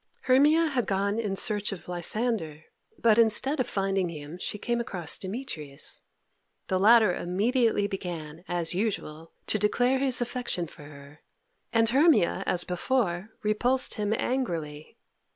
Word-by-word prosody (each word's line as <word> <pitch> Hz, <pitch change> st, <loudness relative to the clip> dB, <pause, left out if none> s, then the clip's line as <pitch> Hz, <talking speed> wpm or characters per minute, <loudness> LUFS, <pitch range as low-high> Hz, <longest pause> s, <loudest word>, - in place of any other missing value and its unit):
Hermia 295 Hz, +6 st, +4 dB
had 260 Hz, -9 st, -1 dB
gone 200 Hz, +2 st, 0 dB
in 205 Hz, -4 st, -2 dB
search 210 Hz, -1 st, 0 dB
of 195 Hz, -, -8 dB
Lysander, 175 Hz, -3 st, -2 dB, 0.3 s
but 230 Hz, -1 st, +4 dB
instead 250 Hz, +6 st, +2 dB
of 250 Hz, -, 0 dB
finding 195 Hz, -2 st, 0 dB
him 155 Hz, +1 st, -8 dB
she 210 Hz, -, -4 dB
came 240 Hz, +3 st, -1 dB
across 185 Hz, -7 st, -2 dB
Demetrius. 185 Hz, -, -6 dB, 0.7 s
The 185 Hz, -, +1 dB
latter 215 Hz, -1 st, +6 dB
immediately 215 Hz, +5 st, +1 dB
began, 175 Hz, -5 st, -6 dB
as 175 Hz, -1 st, -1 dB
usual, 175 Hz, -6 st, -3 dB
to 215 Hz, -, +1 dB
declare 245 Hz, +5 st, +2 dB
his 265 Hz, -2 st, +2 dB
affection 245 Hz, -7 st, -2 dB
for 150 Hz, -2 st, -13 dB
her, 145 Hz, 0 st, -13 dB, 0.5 s
and 225 Hz, -1 st, +3 dB
Hermia, 275 Hz, -, +4 dB
as 175 Hz, -1 st, 0 dB
before, 180 Hz, 0 st, -1 dB
repulsed 245 Hz, +5 st, +1 dB
him 210 Hz, -2 st, -2 dB
angrily. 165 Hz, -, -3 dB
205 Hz, 135 wpm, -27 LUFS, 175-240 Hz, 0.7 s, latter